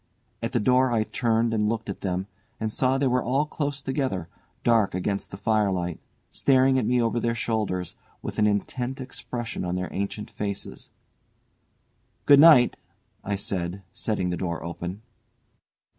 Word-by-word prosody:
At - - -2
the - - +1
door 125 +3 +3
I 110 -2 +2
turned 115 0 +1
and 105 -1 +1
looked 115 0 -2
at 100 - -5
them, 95 -1 -1 0.3
and 110 -1 -2
saw 130 0 +2
they 140 - +1
were 125 -1 +2
all 135 +5 +1
close 145 -2 -3
together, 130 - -2 0.3
dark 115 -6 +3
against 100 +2 -2
the 100 - -8
firelight, 100 -5 0 0.3
staring 130 -1 +4
at 110 - -1
me 125 +1 +3
over 115 0 +1
their 115 0 0
shoulders, 105 -6 -2 0.3
with - - -4
an 105 - +4
intent 125 +6 -2
expression 120 -4 -5
on 90 0 -2
their 90 0 -3
ancient 100 +2 -4
faces. 100 -1 -5 1.4
"Good 140 -1 +8
night," 145 -6 +7 0.5
I 100 - -1
said, 95 -1 -3
setting 95 -5 -1
the 90 - -2
door 85 -4 -3
open. 90 +4 -6
110 Hz, 160 wpm, -26 LUFS, 95-125 Hz, 1.4 s, Good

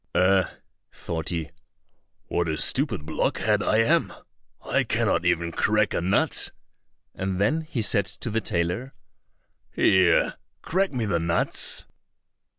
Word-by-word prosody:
"Eh!" 95 0 +4 0.5
thought 80 -1 -5
he, 85 -3 -4 0.7
"what 85 0 -1
a 80 - -1
stupid 110 - 0
blockhead - - 0
I 110 - +2
am! - - +2 0.5
I - - +1
cannot - - 0
even 85 0 +1
crack 105 +3 +1
a - - 0
nut!" 95 +4 +1 0.6
and 95 -1 -3
then 150 +11 +2
he 140 -7 -3
said 100 -2 +2
to 115 - -5
the 115 +1 0
tailor, 90 +8 -2 0.7
"Here, 95 -3 +3 0.3
crack 190 +3 0
me 125 -5 -2
the 90 -5 0
nuts." 85 +1 0
95 Hz, 130 wpm, -25 LUFS, 85-115 Hz, 0.7 s, Eh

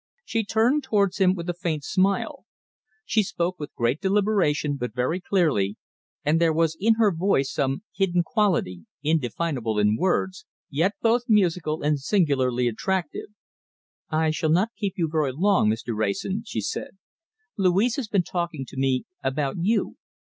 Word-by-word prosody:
She 225 -1 -1
turned 225 +8 +2
towards 205 -8 +1
him 185 -1 +4
with 170 -1 -6
a 175 - -1
faint 165 -4 -3
smile. 195 +4 0 0.6
She 220 - +2
spoke 175 -1 -2
with 150 - -7
great 120 +7 0
deliberation, 190 -8 +1
but 125 -3 -5
very 130 +8 0
clearly, 150 - +1 0.5
and 155 +3 +2
there 165 -1 +4
was 160 0 +1
in 225 +3 +4
her 220 -4 +3
voice 160 -6 +1
some 135 +7 -1
hidden 180 -3 +1
quality, 170 - 0 0.2
indefinable 140 -5 -1
in 105 0 +3
words, 185 +5 -1 0.2
yet 165 +8 +1
both 235 +1 +3
musical 175 -7 +2
and 150 -1 +1
singularly 135 - +1
attractive. 185 - -2 0.8
"I 160 0 +1
shall 155 0 -1
not 185 +8 +2
keep 200 -3 -3
you 170 -3 +1
very 150 -4 0
long, 185 - +3
Mr. 115 +1 -2
Wrayson," 110 - -1
she 110 - -3
said. 150 - -5 0.6
"Louise 200 +4 +2
has 265 -5 -3
been 200 -4 +1
talking 170 -6 -3
to 140 - -12
me 135 -1 +1 0.2
about 135 +2 -1
you. 210 +7 0
170 Hz, 155 wpm, -25 LUFS, 135-195 Hz, 0.8 s, him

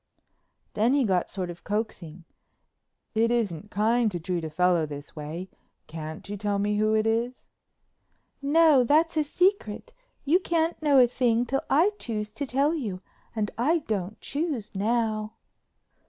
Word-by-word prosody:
Then 225 +5 +2
he 285 - +3
got 185 -5 +1
sort 185 -2 -4
of 175 - -13
coaxing, 185 -6 -4 0.9
"It 225 +1 +2
isn't 210 -6 -1
kind 225 +2 +2
to 175 - -3
treat 170 0 -3
a 160 - -3
fellow 175 0 +2
this 145 0 -9
way. 155 +4 -6 0.4
Can't 155 +1 -8
you 205 +1 -5
tell 205 0 -1
me 205 +1 0
who 215 +1 +2
it 215 0 +2
is?" 235 +3 -1 1.0
"No, 295 -1 +5
that's 315 +7 +3
a 310 - +3
secret. 360 - 0 0.3
You 325 +6 +4
can't 335 -2 0
know 290 -3 +4
a 255 - +8
thing 240 -1 +1
till 270 +3 -1
I 330 +9 +4
choose 210 -2 -4
to 275 +6 -5
tell 280 +5 +2
you 210 - -4 0.3
and 210 -2 -1
I 310 +6 +2
don't 205 -1 -3
choose 285 -8 -3
now." 215 +1 -1
220 Hz, 155 wpm, -26 LUFS, 190-275 Hz, 1.0 s, a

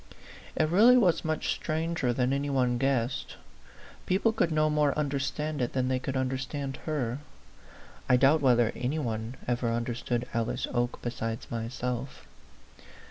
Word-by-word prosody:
It 155 - +2
really 220 +10 +6
was 185 -9 +3
much 155 -1 -1
stranger 160 -4 -1
than 125 +2 +1
any 140 +1 -1
one 125 -3 +1
guessed. 135 -2 -1 0.7
People 205 +5 +2
could 170 -7 +1
no 155 0 +3
more 150 -2 +2
understand 150 +1 -2
it 120 - -1
than 130 -1 0
they 130 0 +1
could 135 +1 -3
understand 135 +1 -3
her. 135 -5 -2 0.9
I 125 - +6
doubt 140 +5 +4
whether 120 -4 +4
any 130 +5 -2
one 115 -3 -3
ever 120 -1 0
understood 120 +1 -2
Alice 115 -1 -1
Oke 120 0 -1
besides 115 -2 -4
myself. 125 +2 -4
130 Hz, 140 wpm, -29 LUFS, 120-150 Hz, 0.9 s, really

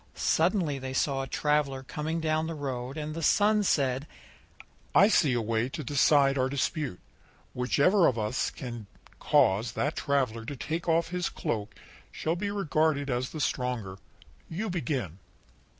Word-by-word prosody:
Suddenly 165 -4 +1
they 130 0 -5
saw 135 0 0
a 135 - -5
traveller 140 -1 0
coming 155 +4 -3
down 155 0 0
the 165 - -4
road, 135 -1 -4
and 155 0 -4
the 165 - -5
Sun 210 +6 +4
said: 140 -6 +1 0.9
"I 200 +3 +7
see 150 - +3
a 120 - +1
way 115 +2 0
to 155 +3 -6
decide 140 0 +3
our 130 0 +1
dispute. 140 - -2 0.5
Whichever 155 +9 +3
of 115 - +1
us 110 +3 -1
can 120 -5 -8 0.3
cause 110 +4 +3
that 145 +6 -1
traveller 130 -6 0
to 140 +5 -6
take 165 +6 -3
off 165 0 +2
his 180 0 -2
cloak 105 -2 -4 0.4
shall 160 +2 -2
be 200 +3 -2
regarded 155 -7 0
as 125 +1 -1
the 155 - -7
stronger 125 -9 -2 0.5
You 190 +5 -3
begin." 125 - -3
140 Hz, 155 wpm, -28 LUFS, 125-160 Hz, 0.9 s, I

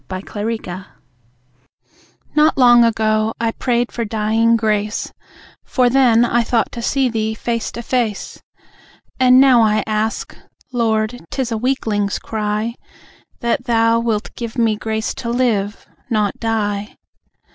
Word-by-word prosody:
In 185 0 -4
Convalescence 205 -4 -5 1.5
Not 305 0 +4
long 240 -2 +6
ago, 220 -1 +1
I 230 -1 0
prayed 240 0 -1
for 235 - -3
dying 225 +1 +1
grace, 210 -1 -1 0.5
For 250 -2 +1
then 240 -3 +4
I 240 0 +2
thought 230 0 0
to 235 - -6
see 265 +2 +1
Thee 220 -2 -2
face 230 0 -3
to 235 - -6
face. 230 -4 -2 0.8
And 255 0 +6
now 260 -3 +6
I 215 -1 +2
ask 215 +1 -2 0.4
(Lord, 225 -1 0
'tis 260 -3 -3
a 225 - -1
weakling's 215 -5 -1
cry) 215 +1 -3 0.7
That 240 +2 -1
Thou 230 -1 +3
wilt 225 -3 -2
give 235 -1 -6
me 225 -2 +2
grace 220 +1 -3
to 235 - -6
live, 225 -4 0 0.2
not 210 -4 0
die. 210 -2 -2
225 Hz, 135 wpm, -18 LUFS, 215-240 Hz, 1.5 s, long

